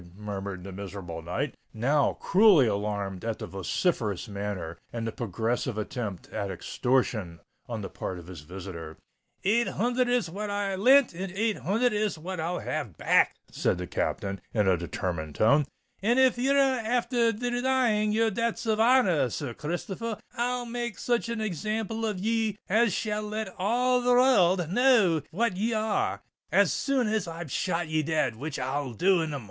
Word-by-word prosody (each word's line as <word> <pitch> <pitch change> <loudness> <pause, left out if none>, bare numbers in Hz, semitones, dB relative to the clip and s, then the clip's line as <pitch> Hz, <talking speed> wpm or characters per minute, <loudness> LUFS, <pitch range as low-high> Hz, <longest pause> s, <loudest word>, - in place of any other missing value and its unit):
murmured 100 -3 -5
the 100 - -7
miserable 95 -3 -7
knight, 90 - -3 0.2
now 140 +6 +2
cruelly 190 - +5
alarmed 100 -3 -2
at 115 -1 -2
the - - -6
ferocious 105 - -1
manner 100 -5 -5
and 115 -1 -4
the 115 - -2
progressive 115 +2 -2
attempt 110 -3 -4
at 100 - -3
extortion 105 -2 -1 0.3
on 115 -3 -4
the - - -3
part 95 - -5
of 85 - -10
his 90 -4 -9
visitor. 85 -1 -8 0.5
"Eight 230 +5 +3
hunthred 245 +3 0
is 245 -7 +2
what 205 +5 -5
I 205 -1 -1
lent, 255 +6 +5
and 185 +2 -5
eight 215 +2 0
hunthred 210 - +1
is 210 -3 0
what 180 +3 -6
I'll 170 +3 -1
have 120 - -4
back," - - +3 0.2
said - - 0
the 90 - -4
Captain, 100 +2 -2
in 105 -3 +3
a 95 - +5
determined 85 -2 -4
tone: 140 +7 +4 0.4
"and 235 +5 +2
if 260 -1 +5
ye're 270 +3 +2 0.3
afther 235 0 +2
denying 245 -2 +1
your 225 +1 +2
debts 230 +3 -1
of 220 -1 +1
honour 230 - +4
r, 125 - +1
Sir 130 0 -4
Christopher, 190 - -4 0.2
I'll 245 0 -1
make 235 -3 -4
such 240 -1 0
an 230 -1 -2
example 215 +3 -2
of 210 -3 -2
ye 220 +1 0
as 225 +3 +3
shall 210 +3 -1
let 210 -2 -4
all 245 +5 +2
the 245 - 0
wor 245 -9 +5
rld 175 -4 -3
know 215 - +4
what 200 +2 0
ye 225 +4 0
are—as 215 -1 0
soon 270 -4 +1
as 215 -4 0
I've 165 -3 -6
shot 175 -2 -1
ye 155 0 +1
dead, 155 -6 0
which 145 +5 -5
I'll 130 0 -2
do 180 - +3
in 160 - -2
the 145 - -4
mornin'." - - -6
180 Hz, 175 wpm, -28 LUFS, -, 0.5 s, cruelly